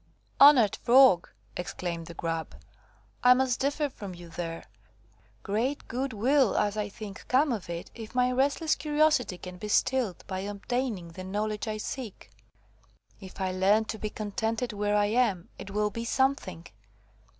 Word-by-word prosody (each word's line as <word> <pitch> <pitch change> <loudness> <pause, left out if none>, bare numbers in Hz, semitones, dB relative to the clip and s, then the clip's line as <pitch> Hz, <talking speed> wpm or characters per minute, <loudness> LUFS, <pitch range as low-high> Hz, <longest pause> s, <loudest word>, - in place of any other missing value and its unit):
"Honoured 270 -8 +7
Frog," 245 -7 +5 0.3
exclaimed 170 -2 -4
the 170 - -9
Grub, 165 -1 -3 0.7
"I 250 0 +8
must 255 -1 +1
differ 290 +2 0
from 200 -8 -9
you 175 -1 -11
there. 165 0 -5 0.8
Great 235 +8 -2
good 260 +3 -2
will, 250 +3 +2
as 205 0 +1
I 210 -1 -2
think, 200 -1 -9
come 270 +3 +3
of 210 -7 -4
it, 170 0 -6
if 225 0 -10
my 250 0 +3
restless 280 +5 +1
curiosity 300 - +1
can 180 0 -9
be 210 - -5
stilled 225 -3 +1
by 185 -1 -4
obtaining 205 -1 -3
the 185 +3 -9
knowledge 210 +3 -3
I 215 0 -2
seek. 215 - -7 0.9
If 190 -1 -11
I 190 -1 -1
learn 195 +4 +3
to 220 0 -5
be 215 - -3
contented 220 +3 -3
where 205 0 0
I 205 0 +3
am, 210 -5 +1
it - - -8
will 210 +1 0
be 230 +3 -5
something. 235 -9 0
215 Hz, 160 wpm, -28 LUFS, 190-255 Hz, 0.9 s, I